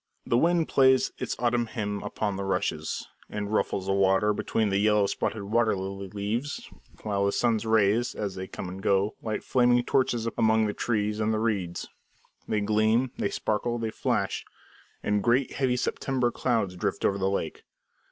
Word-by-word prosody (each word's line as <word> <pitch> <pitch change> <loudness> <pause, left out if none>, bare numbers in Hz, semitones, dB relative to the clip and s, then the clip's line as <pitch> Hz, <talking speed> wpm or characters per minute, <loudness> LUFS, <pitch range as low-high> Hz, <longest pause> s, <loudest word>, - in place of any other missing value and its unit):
The - - +1
wind 165 +5 +3
plays 130 -1 +4
its - - -2
autumn 120 -1 +1
hymn 105 -3 -3
upon 105 0 -2
the 100 - -3
rushes, 90 -5 -2 0.2
and 105 0 -4
ruffles 95 -3 0
the 95 - +1
water 100 +2 +3
between 110 +1 0
the 100 0 +1
yellow 105 -1 +4
spotted 100 +1 -2
water 110 +1 +2
lily 95 +1 -5
leaves, 105 +8 -3 0.4
while 100 -2 0
the - - +2
sun's 115 0 +1
rays, 110 +2 +2
as 100 -2 -3
they 95 0 -6
come 95 - -6
and 95 +2 -7
go, 100 +2 +2
light 110 -2 -3
flaming 125 -1 +3
torches 120 -3 +1
among 110 0 +4
the 105 - -1
trees 105 -2 -1
and 110 0 +1
reeds. 95 -7 -2 0.6
They 105 - 0
gleam, 110 +4 +2
they - - +1
sparkle, 115 +3 -1
they 115 -1 -2
flash; - - -1 0.6
and 105 0 +1
great, 120 +5 +2
heavy, 130 -2 0
September 125 -1 0
clouds 115 -9 0
drift 90 - -2
over 100 0 +1
the 95 0 +1
lake. 100 - -3
105 Hz, 170 wpm, -27 LUFS, 100-120 Hz, 0.6 s, plays